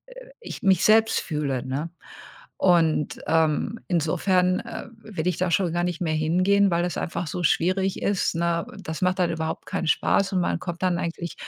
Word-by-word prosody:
äh - - -12
äh - - -17
ich - - -8
mich 190 -3 +3
selbst 220 +1 +4
fühle, 140 -5 -2
ne? 140 +6 -3 0.7
Und, 165 -5 +2
ähm, 160 +7 +1
insofern, 180 +2 +1
äh, 235 - -7
will 200 -7 -6
ich 180 - +1
da 185 -1 0
schon 175 0 +1
gar 175 +1 0
nicht 175 -2 -3
mehr 165 -3 -1
hingehen, 185 +6 +3
weil 170 +1 +1
das 180 - -3
einfach 170 0 -3
so 175 +4 -4
schwierig 185 +3 +1
ist, 195 -4 0
ne? 170 0 0 0.2
Das 160 +3 -6
macht 185 +1 +1
dann 175 -2 +2
überhaupt 160 -1 -4
keinen 170 - -3
Spaß 195 +4 +2
und 185 - +2
man - - -1
kommt 175 -1 -6
dann 180 -2 +2
eigentlich, 170 0 -4
175 Hz, 195 wpm, -24 LUFS, 165-190 Hz, 0.7 s, selbst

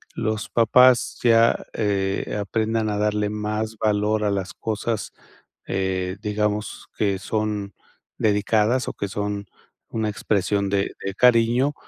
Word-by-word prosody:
los 110 0 -2
papás, 125 +2 +4
ya, 115 -1 +4
eh, 100 -2 -1
aprendan 110 +2 -1
a 105 - -1
darle 105 0 0
más 105 +1 -3
valor 105 0 +1
a 105 - +1
las 100 -1 -3
cosas, 110 0 -3 0.6
eh, 95 -1 -2
digamos 105 0 -2
que 100 -3 0
son 105 -1 -2 0.4
dedicadas, 110 +4 +2
o - - -3
que 100 - -4
son 105 0 -3 0.4
una 110 -1 -1
expresión 100 -1 0
de 100 0 -1
de 95 - -2
cariño, 125 +4 +4
105 Hz, 125 wpm, -23 LUFS, 100-110 Hz, 0.6 s, papás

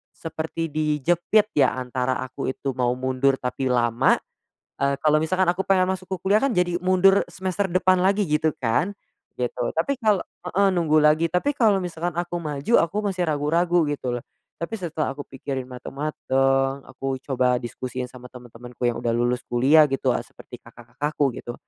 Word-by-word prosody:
seperti 165 0 -4
dijepit 155 +8 +1
ya 135 -3 +3
antara 130 0 -2
aku 130 - -5
itu 135 +1 -3
mau 125 -1 0
mundur, 130 +1 +1
tapi 130 +1 -3
lama, 120 0 +3 0.7
eee, 140 0 +1
kalau 155 -1 +4
misalkan 185 +3 +1
aku 180 +2 +1
pengen 185 -1 +3
masuk 185 0 -4
ku 190 - -1
kuliah 200 +2 +3
kan 275 - +2
jadi 180 -3 +1
mundur 185 +1 +4
semester 185 +2 -2
depan 185 +1 +3
lagi 195 +2 +2
gitu 155 0 +1
kan, 130 - +1 0.5
gitu. 125 0 -2
Tapi 165 +13 0
kalau 215 -6 +2 0.2
heeh, 200 +2 +2
nunggu 160 -3 +3
lagi. 155 +2 +3
Tapi 235 +12 +1
kalau 220 -7 +3
misalkan 175 -1 -4
aku 175 0 -3
maju, 150 +6 -3
aku 170 +4 -3
masih 185 -2 -2
ragu-ragu 165 +3 +2
gitu 130 -4 -2
loh. - - -14 0.3
Tapi 170 +7 -4
setelah 160 -8 -3
aku 145 - -6
pikirin 130 -1 -6
mateng-mateng, 135 0 -1
aku 135 0 -5
coba 125 -2 +1
diskusiin 125 +1 -5
sama 125 -1 -12
teman-temanku 120 0 -12
yang - - -6
udah 115 -1 -1
lulus 120 +1 +1
kuliah 140 +6 +5
gitu, 135 -2 0
eee, - - -1
seperti - - -13
kakak-kakakku 140 +4 -2
gitu, 120 - -7
150 Hz, 170 wpm, -24 LUFS, 130-180 Hz, 0.7 s, kuliah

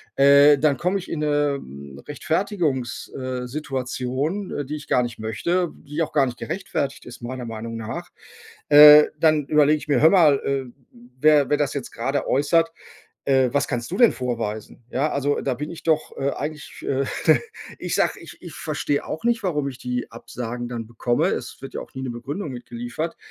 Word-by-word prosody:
Äh, 140 +1 +7
dann 145 -1 +2
komme 185 +3 0
ich 185 - -8
in 160 - -2
'ne, 145 -1 +1
ähm, 70 0 -11
Rechtfertigungs 155 - -2
äh, 130 -1 -4
Situation, 135 +5 -3
äh, 145 - -3
die 150 +3 -5
ich 150 -2 -9
gar 125 - +2
nicht 120 -3 -6
möchte, 170 - -1
die 150 +3 -4
auch 160 - -1
gar 140 -3 +3
nicht 125 -2 -5
gerechtfertigt 155 -5 -3
ist, 120 0 -11
meiner 125 0 -5
Meinung 115 0 -6
nach. 115 0 -6 0.6
Äh, 150 +1 +10
dann 155 -3 +3
überlege 150 +1 +4
ich 150 - -10
mir: 140 -4 +2
„Hör 160 - +8
mal, 160 -7 +6
äh, 135 -1 -1 0.5
wer 150 -2 +5
wer 145 - +3
das 145 -2 0
jetzt 140 - -5
gerade 135 +5 -2
äußert, 165 +4 +2 0.5
äh, 130 -2 +3
was 145 - +1
kannst 120 +1 -4
du 190 - -2
denn 240 -3 +6
vorweisen? 115 -3 -4
Ja. 145 +5 0
Also, 140 +1 0
da - - -1
bin 150 +5 -5
ich 170 - -9
doch, 155 -2 0
äh, 135 - 0
eigentlich, 150 0 -6
äh 135 0 +1 0.7
ich - - -4
sage, - - +2
ich - - -12
ich - - -9
verstehe 145 - -2
auch 160 - -5
nicht, 235 -2 +1
warum 150 -6 -1
ich 130 - -10
die 125 0 -3
Absagen 120 +1 -6
dann 115 -2 -5
bekomme. 120 +1 0
Es - - -5
wird - - -9
ja - - -4
auch - - -12
nie 130 - -6
'ne 130 - -3
Begründung 135 +8 -5
mitgeliefert. 120 +6 -5
140 Hz, 195 wpm, -23 LUFS, 125-155 Hz, 0.7 s, Äh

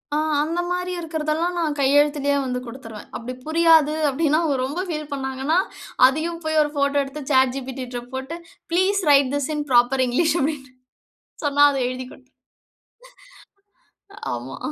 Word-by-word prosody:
ஆ, - - +2 0.3
அந்த 330 +3 -2
மாரி 360 0 -2
இருக்கிறதெல்லாம் 320 +1 -2
நான் 310 -3 -1
கையெழுத்திலயே 285 +1 +3
வந்து 250 -1 -2
குடுத்துருவேன். 225 -3 -10
அப்படி 245 +2 -5
புரியாது 320 -2 +4 0.2
அப்படீன்னா, 305 +2 +1
அவங்க 295 -4 +1
ரொம்ப 290 +7 -4
ஃபீல் 305 -3 -5
பண்ணாங்கன்னா, 265 +3 -1 0.5
அதையும் 315 +6 0
போய் 315 0 +2
ஒரு 295 -1 0
ஃபோட்டோ 280 0 +1
எடுத்து 275 +2 -8
சாட் 260 -1 +4
ஜிபிடிட்ற 255 -2 -6
போட்டு, 265 +5 -5 0.3
please 380 +4 +2
write 275 -2 +5
this 285 +1 -2
in 295 -1 -3
proper 245 +2 +4
English. 305 +6 +1
அப்படீன்னு 275 -2 -2 0.7
சொன்னா 285 0 +4
அது 275 - -2
எழுதிக் 255 0 -6
குடுத்துரும். 260 0 -17 2.0
ஆமா. 120 +2 -7
285 Hz, 145 wpm, -22 LUFS, 265-315 Hz, 2.0 s, write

